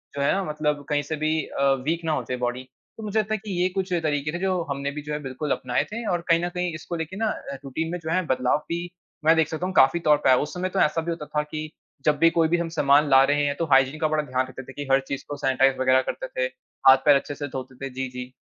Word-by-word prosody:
जो 140 - -2
है 140 - +3
ना, 195 - 0
मतलब 150 -2 -2
कहीं 145 -1 +2
से 155 +2 -3
भी 155 0 +2
अ, - - -3 0.2
वीक 165 +2 -1
ना 160 - +1
हो 155 - 0
जाए 125 - -1
बॉडी। 125 +1 -2 0.3
तो 220 - -8
मुझे 215 +1 0
लगता 215 0 -1
है - - +1
कि 205 - -4
ये 180 - +3
कुछ 185 0 -3
तरीके 150 -1 0
थे, 175 - -3
जो 185 -1 0
हमने 140 0 -2
भी 150 - -6
जो 150 +1 -5
है, 150 - -2
बिल्कुल 135 +2 -4
अपनाए 125 -1 0
थे 230 +1 -5
और 175 -1 0
कहीं 170 +1 +4
न - - -2
कहीं 180 -1 -3
इसको 165 +2 -6
लेके 165 +3 -5
ना 220 -1 0 0.2
अ, 140 - -5
रुटीन 160 +5 -3
में 180 - -3
जो 160 -1 -5
हैं, 185 +1 +1
बदलाव 130 0 +2
भी, 170 +1 -2 0.4
मैं 160 +1 +6
देख 160 -2 +3
सकता 160 +3 -4
हूँ, 185 - -3
काफ़ी 135 +6 +5
तौर 150 -3 +4
पे - - +4
आया। 130 - +6
उस 150 - -3
समय 185 +1 -2
तो 190 +1 -2
ऐसा 165 +2 +2
भी 170 +1 -3
होता 165 -2 -5
था 150 0 -1
कि 155 +1 -6 0.4
जब 150 -1 +3
भी 165 +1 +6
कोई 165 -1 +2
भी 170 +2 +2
हम 170 -1 -2
सामान 145 -2 +3
ला 135 0 +7
रहे 145 0 +2
हैं, 145 0 0
तो 165 - -1
हाइजीन 135 +3 +4
का 155 - +2
बड़ा 155 0 0
ध्यान 130 -2 -1
रखते 130 +1 -9
थे 135 - -12
कि 145 0 -6
हर 135 - +6
चीज़ 140 - -4
को 145 - -3
सैनिटाइज़ 135 -1 +2
वग़ैरह 130 0 +4
करते - - -7
थे, - - -2 0.4
हाथ-पैर 135 +2 +6
अच्छे 145 +1 -2
से 145 0 -5
धोते 130 -1 -7
थे। - - -4
जी, 130 0 -3
जी। 125 0 -8
150 Hz, 295 wpm, -24 LUFS, 135-170 Hz, 0.4 s, ला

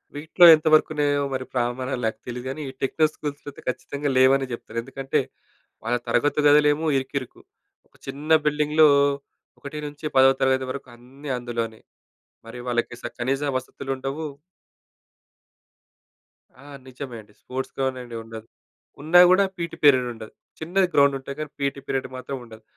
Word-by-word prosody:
వీటిలో 160 +4 +4
ఎంతవరకు 155 0 +3
ఉన్నాయో 145 -1 +1
మరి 130 0 -3
ప్రామాణాలు 125 +1 -2
నాకు 110 - -2
తెలిదు 125 0 -6
గానీ 135 +4 -5
ఈ - - -7
టెక్నో 155 +4 +2
స్కూల్స్‌లో 145 -1 -6
అయితే - - -15
ఖచ్చితంగా 140 +3 -3
లేవనే 135 +1 +5
జెప్తాను. 115 -1 -5
ఎందుకంటే 135 +1 -2 0.7
వాళ్ళ 120 +2 +1
తరగతి 145 +4 +1
గదులేమో 150 +1 +4
ఇరుకిరుకు. 135 -1 -5 0.5
ఒక - - -33
చిన్న 145 +4 -5
బిల్డింగ్‌లో 150 +1 +4 0.7
ఒకటి 145 +2 -8
నుంచి 145 +1 -10
10 130 0 +4
వరకు 140 0 -7
అన్నీ 135 +4 -9
అందులోనే. 115 -2 -4 0.7
మరి 120 +2 -9
వాళ్ళకి 120 0 -1
స - - -6
కనీస 135 +3 -1 0.2
వసతులుండవు. 135 +3 -5 2.4
ఆ! - - -16 0.2
నిజమే 130 -1 -8
అండి. 105 0 -22
Sports 130 +1 -5
ground 130 -1 -1
అనేదుండదు. 115 -2 -9 0.5
ఉన్నా 160 +4 +5
గూడా 190 +2 +5
పీటీ 170 -1 -4
పీరియడ్ 130 -4 +5
ఉండదు. 110 -1 -11 0.3
చిన్నది 180 +4 +1
గ్రౌండ్ 140 -1 +4
ఉంటాయి 140 +1 -8
గానీ 155 -1 -5
పీటీ 140 0 -2
పీరియడ్ 135 -1 -2
మాత్రముండదు. 125 -4 -8
135 Hz, 135 wpm, -24 LUFS, 125-145 Hz, 2.4 s, లేవనే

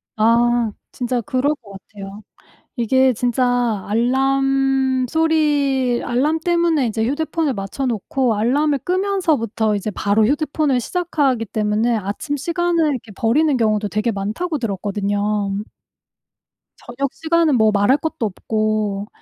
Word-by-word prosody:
아. 235 +1 +2 0.2
진짜 245 -1 -1
그럴 280 +5 0
것 220 -7 -17
같아요. 195 +1 -10 0.6
이게 260 +2 +3
진짜 245 -2 0
알람 270 +2 +1
소리 290 -5 +1
알람 285 +7 +1
때문에 340 -5 +1
이제 220 0 -2
휴대폰을 310 0 -1
맞춰 200 +7 -4
놓고 240 +2 0
알람을 280 +5 +1
끄면서부터 320 - 0
이제 205 +1 -2
바로 210 +2 +1
휴대폰을 290 -1 0
시작하기 285 -7 -1
때문에 215 +3 0
아침 210 +8 -3
시간을 335 +1 0
이렇게 250 -5 -5
버리는 280 +5 +2
경우도 215 -2 +1
되게 215 +3 -1
많다고 220 - -3
들었거든요. 205 -2 -2 1.6
저녁 265 +3 -4
시간은 325 -3 +1
뭐 220 -1 +4
말할 205 +6 +3
것도 315 -5 -3
없고. 215 0 -2
250 Hz, 285 characters per minute, -20 LUFS, 215-290 Hz, 1.6 s, 뭐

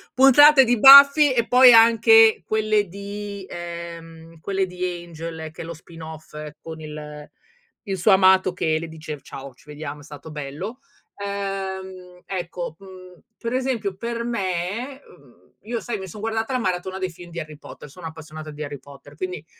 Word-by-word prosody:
puntate 270 +2 +7
di 240 -2 +1
Buffy 280 +3 +9
e 235 -2 0
poi 250 0 +7
anche 225 -1 +6
quelle 215 -1 +1
di, 200 +1 -8
ehm, 170 -1 -9
quelle 195 +3 -2
di 180 0 -7
Angel 165 -2 -7
che 160 - -10
è - - -9
lo 170 - -7
spin 165 +1 -14
off 160 -1 -11 0.3
con 160 -1 -9
il 150 -1 -9 0.6
il 195 -2 -3
suo 185 +4 +3
amato 190 -1 +4
che 160 -3 0
le 165 - -6
dice: 155 -2 -8
"Ciao, 135 -1 -10
ci - - -24
vediamo, 150 0 -8
è - - -14
stato 150 +1 -11
bello." 150 - -7 0.4
Ehm, 190 -2 -6
ecco, 175 -3 -5
mhmm, 185 -2 -14 0.2
per 235 0 -5
esempio 250 -7 -2
per 235 +2 -4
me 225 +4 -3
uhm, - - -22
io 235 +2 -4
sai 225 -3 -5
mi 190 - -7
son 205 +4 -10
guardata 225 +3 -2
la 255 - 0
maratona 185 -2 -3
dei 185 -2 -3
film 175 +1 -13
di 170 0 -7
Harry 155 -2 -8
Potter, 150 - -12
sono 165 +3 -10
appassionata 155 -1 -10
di 150 +1 -7
Harry 145 -1 -7
Potter, 140 +1 -15
quindi 180 -1 -6
185 Hz, 175 wpm, -22 LUFS, 160-215 Hz, 0.6 s, Buffy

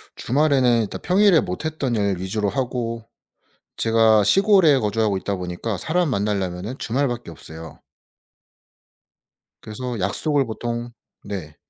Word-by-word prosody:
주말에는 130 -4 +2
일단 105 - -5
평일에 190 -2 +4
못 90 - -5
했던 145 -6 -2
일 100 -3 0
위주로 100 +2 -1
하고 115 0 -3 0.7
제가 110 -2 +4
시골에 190 - +5
거주하고 105 -2 0
있다 100 +1 -3
보니까 90 +4 -4
사람 160 - 0
만나려면은 100 0 -2
주말밖에 120 -4 -2
없어요. 80 0 -10 1.8
그래서 120 +1 -5
약속을 140 - 0
보통 120 +1 -4 0.3
네. 90 -7 -7
115 Hz, 280 characters per minute, -22 LUFS, 100-135 Hz, 1.8 s, 시골에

